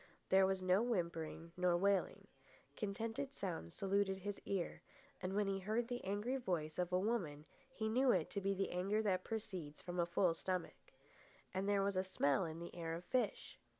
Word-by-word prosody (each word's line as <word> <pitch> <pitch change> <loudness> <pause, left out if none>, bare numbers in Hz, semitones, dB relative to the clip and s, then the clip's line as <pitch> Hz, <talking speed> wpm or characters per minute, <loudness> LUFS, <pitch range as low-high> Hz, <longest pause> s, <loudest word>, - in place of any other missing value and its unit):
There 190 0 +6
was 190 -1 0
no 185 +2 +4
whimpering 170 -7 -2
nor 180 -1 +3
wailing. 195 +1 +2 0.5
Contented 225 +6 -2
sounds 175 - -4
saluted 195 0 +1
his 200 +1 -5
ear, 190 -4 -2 0.4
and 185 +1 -2
when 210 0 +3
he 195 0 0
heard 220 +5 0
the 245 0 -3
angry 205 +7 0
voice 175 -10 -2
of 180 0 0
a 180 - +4
woman 185 -8 -1 0.3
he 220 -4 -2
knew 255 +4 +3
it 175 -7 +1
to 200 - -2
be 195 0 +1
the 195 +1 -1
anger 200 +5 +1
that 185 -3 +2
proceeds 185 -9 -4
from 175 0 -4
a 170 - +3
full 175 0 +3
stomach. 180 +1 -4 0.6
And 190 +2 0
there 200 -1 +3
was 200 -1 +1
a 185 - +3
smell 185 -3 +2
in 160 -1 -5
the 170 +1 -7
air 165 -1 -3
of 175 +2 -7
fish. 245 +1 -1
190 Hz, 190 wpm, -39 LUFS, 175-205 Hz, 0.6 s, There